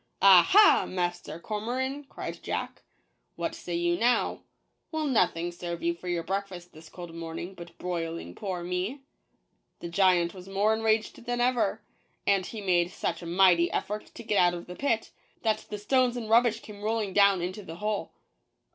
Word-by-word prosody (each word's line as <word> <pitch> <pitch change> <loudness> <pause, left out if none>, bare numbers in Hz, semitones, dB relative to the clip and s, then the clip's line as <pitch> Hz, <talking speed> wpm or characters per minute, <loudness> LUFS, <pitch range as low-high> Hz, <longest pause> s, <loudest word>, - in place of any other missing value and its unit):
"Aha, 195 - +7
Master 175 -2 -3
Cormoran," 255 +8 -3
cried - - -7
jack, - - -4 0.5
"what - - -3
say 175 - -5
you 175 0 +1
now 240 +2 +2 0.3
— - - -49
will 315 -1 -1
nothing 175 - +1
serve 170 -1 -6
you 170 0 +2
for 170 +2 -11
your 175 -1 -1
breakfast 190 -1 -4
this 155 0 -14
cold 175 -1 -9
morning 165 +2 -6
but 170 -2 -12
broiling 165 - -4
poor 185 - -4
me? 180 +10 -3 0.4
" - - -48
The 170 - -6
giant 175 -1 +3
was 185 0 -11
more 200 +3 +2
enraged 220 0 0
than 245 0 -2
ever; 240 -4 +1 0.4
and 195 -2 +2
he 220 - -7
made 175 -3 +2
such 170 -1 -3
a 170 - -7
mighty 175 -1 +4
effort 210 +1 -3
to - - -8
get 210 -2 +1
out 175 0 +4
of 170 - -7
the 180 - -9
pit, 230 -3 -1 0.3
that 220 -1 0
the 210 - -4
stones 250 +3 +2
and 230 -2 -5
rub 230 +3 +5
bish 230 -1 -1
came 205 -1 -11
rolling 215 -2 -1
down 200 -3 +4
into 185 +4 -4
the 165 -4 -9
hole. 210 +3 -3
190 Hz, 180 wpm, -28 LUFS, 175-220 Hz, 0.5 s, Aha